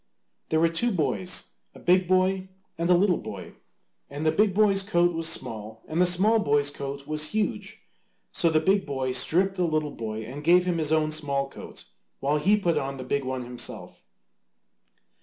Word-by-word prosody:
There 160 Hz, -, +2 dB
were 165 Hz, -, +4 dB
two 165 Hz, +9 st, 0 dB
boys, 130 Hz, -, 0 dB, 0.2 s
a -, -, -12 dB
big 180 Hz, 0 st, +3 dB
boy 185 Hz, +1 st, +1 dB, 0.3 s
and 170 Hz, +1 st, -2 dB
a 180 Hz, -, +6 dB
little 185 Hz, -1 st, +2 dB
boy, 105 Hz, -4 st, -8 dB, 0.6 s
and 145 Hz, +2 st, -5 dB
the 155 Hz, -, +4 dB
big 205 Hz, 0 st, +2 dB
boy's 200 Hz, -2 st, +4 dB
coat 175 Hz, -3 st, +1 dB
was 165 Hz, 0 st, -1 dB
small 110 Hz, -6 st, -4 dB
and 160 Hz, +3 st, -1 dB
the 180 Hz, -, +5 dB
small 200 Hz, +6 st, +4 dB
boy's 145 Hz, -5 st, +2 dB
coat 140 Hz, 0 st, -6 dB
was 150 Hz, +2 st, -1 dB
huge. 215 Hz, -1 st, -3 dB, 0.5 s
So 170 Hz, -, +2 dB
the 155 Hz, -1 st, +3 dB
big 195 Hz, +3 st, +1 dB
boy 130 Hz, -2 st, -2 dB
stripped 180 Hz, +9 st, +2 dB
the 180 Hz, -, +1 dB
little 155 Hz, -3 st, -1 dB
boy 110 Hz, -1 st, -5 dB
and 135 Hz, +7 st, -8 dB
gave 175 Hz, +3 st, +5 dB
him 175 Hz, -2 st, -1 dB
his 155 Hz, -1 st, -1 dB
own 155 Hz, -1 st, +2 dB
small 140 Hz, -3 st, -1 dB
coat, -, -, -10 dB, 0.4 s
while 145 Hz, +2 st, 0 dB
he 195 Hz, +8 st, +3 dB
put 175 Hz, -5 st, 0 dB
on 135 Hz, 0 st, -5 dB
the 130 Hz, -, -6 dB
big 140 Hz, +2 st, -1 dB
one 130 Hz, -1 st, -4 dB
himself. 120 Hz, 0 st, -6 dB
155 Hz, 190 wpm, -26 LUFS, 140-180 Hz, 0.6 s, a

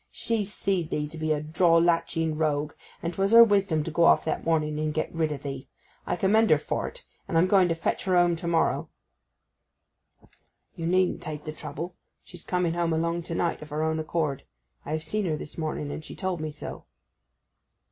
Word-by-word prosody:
She 230 Hz, -2 st, -1 dB
seed 195 Hz, -4 st, -2 dB
thee 150 Hz, 0 st, -1 dB
to 160 Hz, -, -8 dB
be 155 Hz, 0 st, -1 dB
a 150 Hz, -, +2 dB
drawlacheting 165 Hz, -1 st, +2 dB
rogue, 150 Hz, -1 st, 0 dB, 0.3 s
and 170 Hz, +1 st, -2 dB
'twas 195 Hz, +4 st, +1 dB
her 230 Hz, 0 st, +11 dB
wisdom 195 Hz, -8 st, +2 dB
to 165 Hz, -, -5 dB
go 165 Hz, +2 st, +3 dB
off -, -, +5 dB
that 160 Hz, -, -2 dB
morning 155 Hz, -2 st, 0 dB
and 155 Hz, 0 st, 0 dB
get 155 Hz, +1 st, -2 dB
rid 160 Hz, -2 st, 0 dB
o' 150 Hz, -, -2 dB
thee. 135 Hz, -1 st, -7 dB, 0.4 s
I -, -, 0 dB
commend 215 Hz, +5 st, +3 dB
her -, -, +6 dB
for't, -, -, -4 dB, 0.2 s
and 165 Hz, -, 0 dB
I'm 165 Hz, -, +5 dB
going 185 Hz, -1 st, +4 dB
to 165 Hz, -, 0 dB
fetch 165 Hz, -, -2 dB
her 185 Hz, -1 st, +2 dB
home 175 Hz, -1 st, +4 dB
to 170 Hz, +1 st, -6 dB
morrow.' 170 Hz, -1 st, +1 dB, 1.9 s
'You 165 Hz, -, -3 dB
needn't 185 Hz, +1 st, +2 dB
take 150 Hz, -1 st, -6 dB
the 155 Hz, -, -5 dB
trouble. 155 Hz, +4 st, -6 dB, 0.3 s
She's 175 Hz, -2 st, -10 dB
coming 180 Hz, -2 st, 0 dB
home 170 Hz, -1 st, 0 dB
along 170 Hz, +1 st, 0 dB
to 165 Hz, 0 st, -5 dB
night 170 Hz, 0 st, -1 dB
of 155 Hz, -, -9 dB
her 150 Hz, +1 st, -2 dB
own 160 Hz, 0 st, 0 dB
accord. 155 Hz, -3 st, -1 dB, 0.4 s
I 150 Hz, -, -3 dB
have 155 Hz, 0 st, -2 dB
seen 210 Hz, +1 st, -2 dB
her 155 Hz, -2 st, 0 dB
this 150 Hz, -, -8 dB
morning, 155 Hz, -2 st, -3 dB
and 155 Hz, -, -6 dB
she -, -, -10 dB
told 185 Hz, -4 st, -3 dB
me 155 Hz, -, -3 dB
so. 150 Hz, -, -8 dB
165 Hz, 205 wpm, -27 LUFS, 155-180 Hz, 1.9 s, her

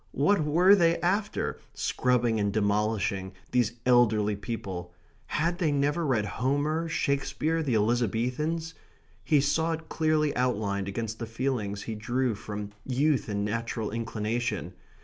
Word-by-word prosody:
What 155 Hz, +5 st, +3 dB
were 175 Hz, +6 st, +5 dB
they 170 Hz, -4 st, +4 dB
after, 200 Hz, +4 st, 0 dB, 0.2 s
scrubbing 120 Hz, -3 st, +1 dB
and 100 Hz, -1 st, +1 dB
demolishing, 100 Hz, -2 st, 0 dB, 0.2 s
these 120 Hz, -3 st, +2 dB
elderly 110 Hz, -4 st, +4 dB
people? 95 Hz, -5 st, -5 dB, 0.4 s
Had 170 Hz, +3 st, 0 dB
they 165 Hz, -5 st, +2 dB
never 145 Hz, +3 st, +1 dB
read 115 Hz, -6 st, +1 dB
Homer, 145 Hz, -, 0 dB
Shakespeare, 155 Hz, +3 st, 0 dB
the 135 Hz, -7 st, 0 dB
Elizabethans? 125 Hz, +9 st, 0 dB, 0.5 s
He 150 Hz, -3 st, +3 dB
saw 160 Hz, +4 st, +1 dB
it 160 Hz, 0 st, -7 dB
clearly 155 Hz, -2 st, +1 dB
outlined 105 Hz, -6 st, 0 dB
against 110 Hz, +2 st, -4 dB
the 115 Hz, -, -4 dB
feelings 115 Hz, -4 st, -2 dB
he 115 Hz, -, -4 dB
drew 120 Hz, +3 st, 0 dB
from 105 Hz, 0 st, -6 dB
youth 135 Hz, -2 st, +1 dB
and 100 Hz, 0 st, -1 dB
natural 115 Hz, 0 st, -2 dB
inclination. 115 Hz, -5 st, -2 dB
120 Hz, 130 wpm, -28 LUFS, 105-150 Hz, 0.5 s, were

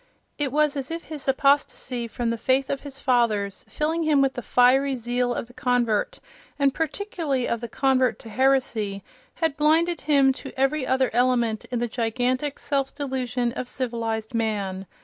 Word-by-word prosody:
It 285 Hz, -3 st, 0 dB
was 300 Hz, +1 st, +2 dB
as 275 Hz, -1 st, -4 dB
if 330 Hz, +1 st, -4 dB
his 305 Hz, -3 st, -8 dB
apostasy 270 Hz, -3 st, +1 dB
from 230 Hz, 0 st, -2 dB
the 230 Hz, -, -2 dB
faith 260 Hz, +3 st, +1 dB
of 275 Hz, -, -2 dB
his 275 Hz, -1 st, -8 dB
fathers, 215 Hz, -7 st, +1 dB
filling 320 Hz, +2 st, -1 dB
him 310 Hz, -3 st, +3 dB
with 270 Hz, -1 st, +3 dB
the 245 Hz, -, -5 dB
fiery 265 Hz, +3 st, +3 dB
zeal 245 Hz, +1 st, -1 dB
of 240 Hz, -, -2 dB
the 245 Hz, -, -18 dB
convert, 245 Hz, -, 0 dB, 0.4 s
and 280 Hz, -2 st, +2 dB
particularly 320 Hz, -5 st, -2 dB
of 235 Hz, -, -1 dB
the 235 Hz, -, -5 dB
convert 260 Hz, 0 st, +2 dB
to 225 Hz, -, -11 dB
heresy, 235 Hz, -6 st, +1 dB, 0.3 s
had 320 Hz, -4 st, 0 dB
blinded 320 Hz, +3 st, +2 dB
him 280 Hz, -3 st, +4 dB
to 270 Hz, -1 st, -9 dB
every 270 Hz, +1 st, +1 dB
other 260 Hz, 0 st, +2 dB
element 240 Hz, -2 st, +1 dB
in 250 Hz, -, -3 dB
the 240 Hz, +1 st, 0 dB
gigantic 250 Hz, +4 st, -1 dB
self 275 Hz, -2 st, -2 dB
delusion 255 Hz, -4 st, -2 dB
of 250 Hz, -, -5 dB
civilized 230 Hz, -2 st, -3 dB
man. 200 Hz, -4 st, -2 dB
260 Hz, 170 wpm, -24 LUFS, 235-280 Hz, 0.4 s, him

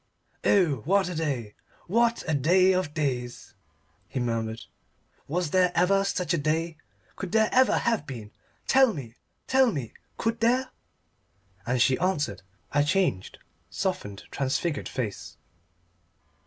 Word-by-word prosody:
"Oh, 175 Hz, -9 st, +3 dB
what 190 Hz, +2 st, +2 dB
a -, -, -4 dB
day 135 Hz, -10 st, -2 dB, 0.3 s
what 235 Hz, +4 st, +2 dB
a 160 Hz, -, +1 dB
day 180 Hz, +7 st, +4 dB
of 185 Hz, -4 st, -1 dB
days!" 125 Hz, -5 st, -3 dB, 0.5 s
he -, -, -4 dB
murmured. 115 Hz, -2 st, -2 dB, 0.6 s
"Was 170 Hz, +1 st, -1 dB
there 180 Hz, -1 st, +3 dB
ever 195 Hz, +3 st, +3 dB
such 180 Hz, -3 st, -1 dB
a 170 Hz, -, +1 dB
day? 160 Hz, +2 st, -1 dB, 0.4 s
Could 190 Hz, -3 st, -6 dB
there 220 Hz, -1 st, +4 dB
ever 260 Hz, 0 st, +4 dB
have 230 Hz, -9 st, 0 dB
been? 115 Hz, -5 st, -8 dB, 0.3 s
Tell 265 Hz, -5 st, +4 dB
me 120 Hz, -6 st, -7 dB, 0.3 s
tell 260 Hz, -2 st, +4 dB
me! 135 Hz, -, -5 dB, 0.2 s
Could 225 Hz, 0 st, -1 dB
there?" 250 Hz, +3 st, +2 dB, 1.0 s
And 125 Hz, +1 st, +1 dB
she 130 Hz, +2 st, +3 dB
answered, 150 Hz, -, 0 dB
turning 95 Hz, 0 st, -22 dB, 0.3 s
aside -, -, +5 dB
a -, -, -4 dB
changed, 175 Hz, -, 0 dB, 0.3 s
softened, 100 Hz, -1 st, -3 dB
transfigured 140 Hz, +3 st, -1 dB
face. 115 Hz, -6 st, -5 dB
160 Hz, 140 wpm, -27 LUFS, 130-195 Hz, 1.0 s, aside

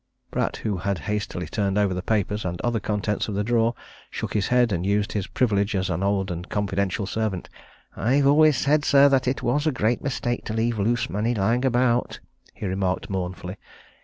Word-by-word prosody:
Pratt, -, -, -1 dB
who 105 Hz, -3 st, -2 dB
had 100 Hz, +2 st, -1 dB
hastily 100 Hz, -3 st, -2 dB
turned 100 Hz, -2 st, -1 dB
over 100 Hz, -2 st, +2 dB
the 90 Hz, -, -3 dB
papers 105 Hz, +1 st, -1 dB
and 90 Hz, -2 st, -3 dB
other 120 Hz, -1 st, 0 dB
contents 105 Hz, 0 st, -1 dB
of 105 Hz, -, -3 dB
the 105 Hz, -, 0 dB
drawer, 115 Hz, +1 st, +2 dB, 0.3 s
shook -, -, -5 dB
his 105 Hz, -3 st, +1 dB
head 125 Hz, -2 st, +3 dB
and 90 Hz, -2 st, -1 dB
used 100 Hz, +2 st, +1 dB
his 100 Hz, -3 st, -2 dB
privilege 105 Hz, -4 st, +1 dB
as 95 Hz, 0 st, 0 dB
an 90 Hz, +2 st, -2 dB
old 100 Hz, -1 st, 0 dB
and 90 Hz, +1 st, -6 dB
confidential 100 Hz, -1 st, -1 dB
servant. 105 Hz, -2 st, -2 dB, 0.5 s
"I've 135 Hz, +4 st, +2 dB
always 150 Hz, 0 st, +5 dB
said, 145 Hz, +3 st, +2 dB
sir, 140 Hz, -1 st, +6 dB
that 130 Hz, -2 st, +2 dB
it 130 Hz, -, -1 dB
was 145 Hz, +6 st, +1 dB
a -, -, +3 dB
great 120 Hz, -2 st, 0 dB
mistake 120 Hz, -3 st, -2 dB
to 110 Hz, -, -3 dB
leave 115 Hz, 0 st, 0 dB
loose 120 Hz, +3 st, +1 dB
money 115 Hz, +3 st, -1 dB
lying 115 Hz, +5 st, +1 dB
about," 125 Hz, -1 st, +1 dB, 0.4 s
he -, -, -6 dB
remarked 95 Hz, 0 st, -1 dB
mournfully. 90 Hz, 0 st, -4 dB
105 Hz, 195 wpm, -24 LUFS, 95-120 Hz, 0.5 s, sir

